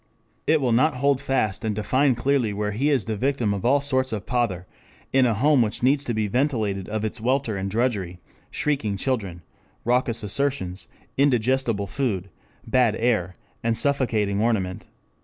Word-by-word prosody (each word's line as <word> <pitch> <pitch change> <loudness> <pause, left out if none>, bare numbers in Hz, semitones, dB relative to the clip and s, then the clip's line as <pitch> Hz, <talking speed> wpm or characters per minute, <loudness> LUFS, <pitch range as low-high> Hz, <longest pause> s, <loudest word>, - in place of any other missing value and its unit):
It 160 0 +4
will 125 -3 +1
not 130 +6 +3
hold 140 +1 +1
fast 130 -8 -1
and 110 -2 -1
define 130 +5 +2
clearly 120 -3 +1
where 105 0 -2
he 130 +9 0
is 135 -9 +2
the 110 - -2
victim 125 -2 0
of 100 - -4
all 135 +4 +4
sorts 130 -2 0
of 105 -4 -4
pother, 110 -6 -1 0.5
in 130 -1 +5
a 115 - +1
home 140 +4 +4
which 110 +1 -1
needs 135 +2 +3
to 120 - -2
be 110 -1 0
ventilated 110 -5 -1
of 110 0 -2
its 110 +1 -4
welter 125 -2 0
of 95 0 -3
drudgery, 100 -6 -1 0.3
shrieking 125 -9 -1
children, 95 -8 -2 0.4
raucous 120 -1 +1
assertions, 105 -5 -2 0.3
indigestible 125 -5 +2
food, 100 -6 -2 0.3
bad 115 -2 +2
air, 105 -7 0 0.3
and 115 0 +1
suffocating 110 -8 +1
ornament. 100 -6 -1
115 Hz, 165 wpm, -24 LUFS, 105-130 Hz, 0.5 s, in